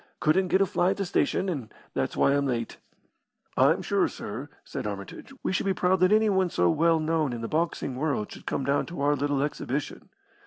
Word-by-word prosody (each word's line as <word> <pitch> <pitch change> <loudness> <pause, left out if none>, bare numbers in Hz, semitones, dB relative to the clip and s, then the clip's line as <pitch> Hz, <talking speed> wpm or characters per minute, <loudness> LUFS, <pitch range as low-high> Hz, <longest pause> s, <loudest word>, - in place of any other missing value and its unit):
Couldn't 185 +5 +3
get 190 +2 +3
a - - +5
fly 180 -1 +1
at 195 - 0
the 200 - -1
station, 185 +1 +1
and 140 -11 -4 0.2
that's - - -2
why 140 - +4
I'm 140 0 +1
late." 115 -3 -2 0.8
"I'm - - +4
sure, - - +2
sir," 125 +8 -7
said - - -5
Armitage, 100 - -7
"we - - 0
should 190 - 0
be 190 - +1
proud 185 +1 +2
that 185 +2 +4
anyone 205 -4 +3
so 90 - +2
well 165 - +3
known 155 -4 0
in 120 - -5
the 115 - -3
boxing 155 -4 -1
world 135 -6 -1
should - - -12
come 140 - -1
down 140 +1 +1
to 170 -4 -6
our 145 +1 +3
little 145 0 0
exhibition." 145 -1 -4
150 Hz, 210 wpm, -27 LUFS, 135-180 Hz, 0.8 s, a